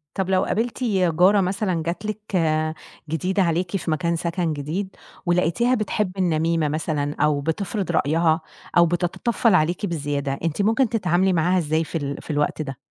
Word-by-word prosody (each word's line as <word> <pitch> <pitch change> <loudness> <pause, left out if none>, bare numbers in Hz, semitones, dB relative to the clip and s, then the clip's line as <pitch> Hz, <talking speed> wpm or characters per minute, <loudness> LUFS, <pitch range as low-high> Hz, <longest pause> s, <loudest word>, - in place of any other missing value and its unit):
طَب 190 -1 -1
لو 185 -1 +3
قابلتِ 235 +4 -2
جارة 190 -2 +3
مثلًا 185 -2 -1
جات 175 +5 -4
لِك 210 -2 -3 0.7
جديدة 185 +4 0
عليكِ 170 +2 0
في 165 -2 -3
مكان 170 +2 0
سكن 170 -1 -1
جديد 165 +7 -4 0.3
ولقيتيها 180 +8 +2
بتحب 210 -3 -1
النميْمة 165 -3 +1
مثلًا 150 -1 -2
أو 150 -1 +2
بتفْرض 190 +6 -2
رأيها 160 +2 +2 0.4
أو 170 - +7
بتتطفّل 185 +6 +1
عليكِ 175 +4 +1
بزيادة، 145 -5 -2
أنتِ 165 +3 0
ممكن 225 +4 +2
تتعاملي 185 -3 +2
معاها 175 +3 +2
إزاي 160 -1 +1
في 165 - -4
ال 140 -2 -4
في - - -6
الوقت 150 +1 0
ده؟ 135 -4 -5
175 Hz, 160 wpm, -23 LUFS, 155-190 Hz, 0.7 s, أو